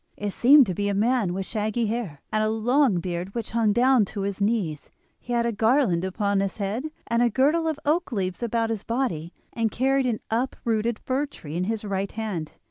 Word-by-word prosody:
It 205 0 -3
seemed 275 +6 +6
to 190 - -2
be 205 +3 -1
a 200 - 0
man 225 -2 +2
with 190 +1 -3
shaggy 215 +2 -1
hair, 210 -10 -3
and 215 0 +1
a 215 - +1
long 230 -1 +2
beard 180 +2 -4
which 230 -2 -4
hung 225 -2 +2
down 250 +2 +4
to 200 +1 -6
his 200 0 -3
knees. 200 -8 -1 0.3
He 245 - -9
had 235 -1 +1
a 235 - +1
garland 220 -5 +2
upon 200 +1 0
his 195 -1 -2
head, 210 +6 -2 0.2
and 235 0 +1
a 240 - +4
girdle 295 +8 +2
of 310 -2 -2
oak 310 +1 +1
leaves 185 -3 -2
about 230 -1 0
his 220 -3 -2
body, 220 - -2 0.2
and 230 -1 0
carried 265 +3 +1
an 230 -3 -1
uprooted 230 -1 -1
fir 270 +3 -1
tree 155 - -9
in 180 +1 0
his 220 +1 -3
right 195 -1 -2
hand. 205 -8 -4
220 Hz, 210 wpm, -25 LUFS, 195-245 Hz, 0.3 s, seemed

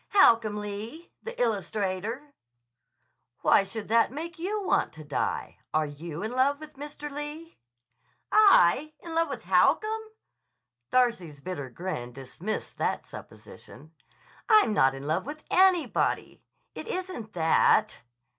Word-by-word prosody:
"Holcomb 230 - +5
Lee, 210 +10 -7
the 470 +1 -8
illustrator." 215 - -2 1.1
"Why - - +5
should 215 +2 -7
that 230 +1 +3
make 330 +5 -7
you 405 +4 -2
want - - +1
to 155 - -11
die? 145 -1 -3 0.2
Are 155 0 +3
you 155 +4 -7
in 220 - -3
love 270 +3 +2
with 310 0 -11
Mr. 295 +1 -8
Lee?" 295 +3 -8 0.7
"I 310 - +5
in 335 - -7
love 330 0 +1
with - - -6
Holcomb!" 440 +1 +2 0.9
Darcy's 210 - +1
bitter 145 -4 -6
grin 125 -5 -5
dismissed 135 - -6
that - - -1
supposition. 155 +3 -13 0.6
"I'm 430 - +6
not 135 -8 +3
in 135 +1 -8
love 160 - -1
with 305 +1 -7
anybody. 370 -3 +2 0.3
It - - -8
isn't 370 - -5
that." 165 -2 +3
230 Hz, 125 wpm, -27 LUFS, -, 1.1 s, I'm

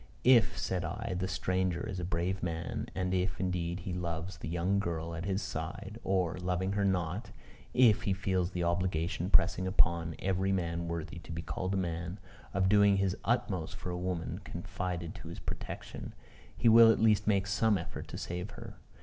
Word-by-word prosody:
If, 125 -3 +5
said 90 -1 -1
I, 80 - -3
the 95 +1 -1
stranger 95 -1 0
is 95 -3 -4
a - - -3
brave 90 +2 -1
man, 85 -2 -3
and 90 0 -1
if, 90 0 0
indeed, 90 -1 -1
he 90 +1 -4
loves 85 +1 -3
the - - -5
young 90 +4 +1
girl 85 -3 -2
at 85 +2 -4
his 95 +1 -1
side 95 +7 -5
or, 90 -3 +1
loving 90 +1 0
her 100 0 +1
not, 90 0 0 0.5
if 120 -5 +6
he 100 - 0
feels 95 -2 0
the 90 -2 -2
obligation 85 0 0
pressing 95 -1 +4
upon 85 -3 +2
every 95 0 0
man 85 -2 -1
worthy 85 0 -4
to 85 0 -11
be 85 +1 -4
called 95 +3 -2
a - - +1
man, 85 +1 -3 0.3
of 95 0 +2
doing 100 0 +5
his 95 -1 +1
utmost - - 0
for 90 - -5
a - - -3
woman 90 -1 -3
confided 90 -2 -4
to - - -10
his 85 +3 -7
protection 85 - -6 0.4
he - - +2
will 115 0 +9
at - - +1
least 105 -2 +4
make 100 -2 +3
some 105 +1 +2
effort 85 - -6
to - - -7
save 90 +3 -4
her. - - -9
90 Hz, 190 wpm, -32 LUFS, 85-95 Hz, 0.5 s, will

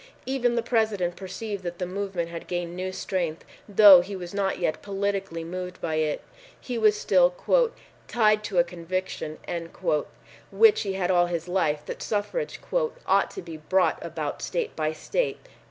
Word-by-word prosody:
Even 250 -2 +1
the 235 - 0
President 215 -7 +1
perceived 200 +1 -5
that 175 -1 -5
the 180 - -2
movement 185 -2 -3
had 170 0 -7
gained 175 -1 -3
new 185 +1 -3
strength, 175 -4 -3 0.2
though 200 -3 +9
he 195 +3 -6
was 180 -1 -7
not 200 -1 0
yet 155 - -1
politically 195 -4 -2
moved 180 +2 -6
by 160 - -2
it. 155 -1 0 0.4
He 250 - -5
was 215 -1 +4
still 180 -3 +4 0.7
"tied 215 -2 +3
to 190 - -3
a 175 - +7
conviction" 175 -2 -4 1.1
which 445 -1 +5
he 195 -3 -2
had 190 - -4
had 180 +1 +2
all 175 -1 +4
his 170 -1 -3
life 155 -5 0
that - - -6
suffrage 225 - -2 0.5
"ought - - +3
to - - -8
be 165 -2 -8
brought 185 +5 +1
about - - -4
state - - -2
by 155 0 0
state." 325 - -1
185 Hz, 170 wpm, -26 LUFS, 175-205 Hz, 1.1 s, though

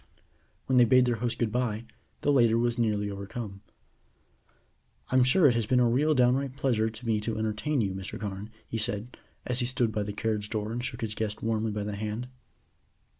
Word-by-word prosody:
When 130 -1 +3
they 120 - +7
bade 130 +1 +5
their 120 -2 0
host 120 +1 -2
good 115 -3 0
bye, 120 -2 -1 0.4
the 145 - +2
later 120 -5 +4
was 120 +1 0
nearly 105 -3 +1
overcome. 100 0 -6 1.5
"I'm 130 0 +4
sure 150 +7 +5
it 135 - +7
has 115 -2 -1
been 125 +1 +3
a 125 - +4
real 145 +6 +2
downright 130 +1 +2
pleasure 115 -6 +1
to 110 +2 -11
me 110 -2 +1
to 110 +1 -3
entertain 110 +6 0
you, 95 -3 -1
Mr. 95 +1 -6
Carne," 100 0 -5 0.2
he 115 - -3
said, 110 +1 -3 0.3
as 125 0 -1
he 120 - +1
stood 125 -3 +1
by 105 - -1
the 105 0 -3
carriage 105 0 -2
door 110 -1 -2
and 120 +1 -3
shook 130 - -4
his 110 -2 -2
guest 105 -1 -3
warmly 110 0 0
by 105 0 -3
the 105 0 -4
hand. 110 +4 -4
115 Hz, 205 wpm, -28 LUFS, 105-125 Hz, 1.5 s, they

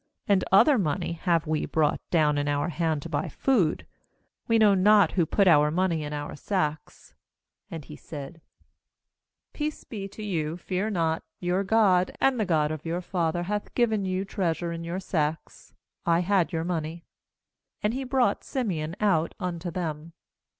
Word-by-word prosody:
22And 200 -3 +3
other 260 +9 +6
money 155 -3 -1
have 170 -1 0
we 155 0 -1
brought 155 -2 +1
down 150 -4 +3
in 145 - -1
our 145 +3 0
hand 160 -3 -1
to - - -6
buy 150 -3 -2
food. 205 -13 +1 0.6
We 230 - +3
know 215 -2 +6
not 205 +1 +5
who 170 -4 +1
put 200 - +2
pur 150 -3 +6
money 170 -1 0
in 145 - -5
our 145 0 -5
sacks.' 155 -3 -3 0.6
23Andhesaid: 155 0 -8 1.1
'Peace 305 0 -4
be 200 -4 -6
to 205 +2 -10
you, 165 -5 -2
fear 185 +4 -2
not; 165 -5 0 0.2
your 180 +2 0
God, 190 -3 +3
and 265 -3 +2
the 215 - 0
God 155 -3 +2
of 155 -1 -5
your 170 +2 -2
father, 175 -2 -1
hath 210 +3 -4
given 220 -4 +2
you 185 +1 -1
treasure 175 -4 -2
in 165 0 -5
your 170 +3 -3
sacks; 160 -4 -3 0.3
I 170 0 +3
had 185 -1 +1
your 165 -2 -1
money.' 165 -1 -4 0.8
And 210 +2 +1
he 265 +2 -3
brought 255 -5 +1
Simeon 175 - -3
out 180 -6 +1
unto 175 -2 -3
them. 165 -2 -5
175 Hz, 165 wpm, -26 LUFS, 160-200 Hz, 1.1 s, other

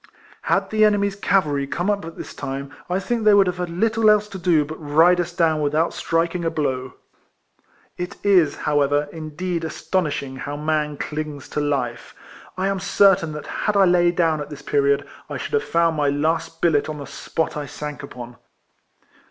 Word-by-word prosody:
Had - - 0
the 215 0 +3
enemy's 200 -2 +3
cavalry 155 -9 +1
come 175 +6 -2
up 205 -1 0
at 165 - -9
this - - -8
time 140 0 -5 0.2
I 180 +2 +1
think 230 +3 -2
they 210 -1 +6
would 200 -1 +6
have 180 -1 -2
had 180 -1 -2
little 220 +5 +2
else 210 0 +4
to 190 - -7
do 165 -4 +3
but 155 +2 -7
ride 160 +4 +4
us 175 0 -1
down 160 -3 +1
without 150 +3 +1
striking 170 +1 -1
a 165 - +1
blow. 130 -5 -2 1.0
It 180 0 -4
is, 180 -8 +4
however, 145 0 +1
indeed 165 +2 -4
astonishing 150 -4 -2
how 145 +2 -5
man 150 -1 -1
clings 150 -2 -5
to - - -2
life. 135 -5 -2 0.4
I 190 +1 0
am 195 -1 -1
certain 195 -3 +3
that 150 - -7
had 210 -1 -1
I 195 - +6
lain 175 -1 +3
down 160 -3 +2
at 145 - -6
this 150 -1 -9
period, 140 -1 +1 0.2
I - - -4
should - - -6
have 445 - +2
found 165 -1 +1
my 145 -1 +2
last 160 +3 -1
billet 155 -3 +2
on 155 - -4
the 140 - -7
spot 160 - -3
I 150 -1 -4
sank 150 0 -6
upon. 125 -3 -9
160 Hz, 190 wpm, -22 LUFS, 145-180 Hz, 1.0 s, they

